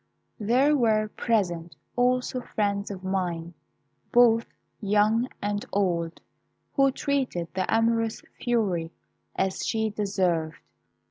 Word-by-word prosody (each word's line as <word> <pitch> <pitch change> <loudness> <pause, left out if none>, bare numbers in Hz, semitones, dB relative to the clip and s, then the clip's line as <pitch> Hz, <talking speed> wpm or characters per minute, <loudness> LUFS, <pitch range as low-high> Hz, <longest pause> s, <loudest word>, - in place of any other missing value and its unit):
"There 255 +8 +3
were 215 -5 +2
present 175 -9 -1 0.2
also 250 0 +1
friends 200 -3 -1
of 195 -2 -7
mine, 175 -3 -2 0.6
both 230 -1 +5 0.3
young 210 +3 +3 0.2
and 205 0 -1
old, 170 -4 0 0.5
who 275 -1 +4
treated 260 -12 -1
the 185 0 -1
amorous 225 0 +1 0.2
fury 200 -9 0 0.5
as 190 -1 -1
she 220 -1 0
deserved. 185 -6 0
210 Hz, 105 wpm, -26 LUFS, 185-230 Hz, 0.6 s, both